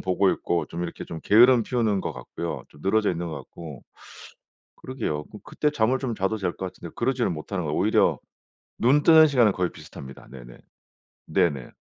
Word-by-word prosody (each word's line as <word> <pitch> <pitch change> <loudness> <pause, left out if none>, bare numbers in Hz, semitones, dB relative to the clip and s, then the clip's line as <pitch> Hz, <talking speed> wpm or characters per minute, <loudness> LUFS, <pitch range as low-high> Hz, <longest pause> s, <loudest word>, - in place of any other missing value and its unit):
보고 95 +1 +2
있고 85 - -1
좀 85 +1 -6
이렇게 85 - -7
좀 80 - -7
게으름 120 +3 +6
피우는 110 -6 0
것 80 - -4
같고요. 70 +6 -6
좀 75 - -19
늘어져 105 +2 +2
있는 85 0 -4
것 80 - -5
같고. 80 -6 -10 0.9
그러게요. 110 - -4
그럼 - - -13
그때 150 - -1
잠을 130 -2 +1
좀 130 -4 -3
자도 100 +2 -1
될 90 -3 -2
것 95 - -4
같은데 85 - -11
그러지를 125 0 0
못하는 85 +3 -4
거예요. 75 0 -2
오히려 105 +4 +2 0.6
눈 135 +5 +3
뜨는 160 0 +7
시간은 120 -7 +4
거의 90 -2 -1
비슷합니다. 65 -1 -12
네네. - - -12 0.7
네네. 70 -7 0
95 Hz, 385 characters per minute, -25 LUFS, 80-120 Hz, 0.9 s, 뜨는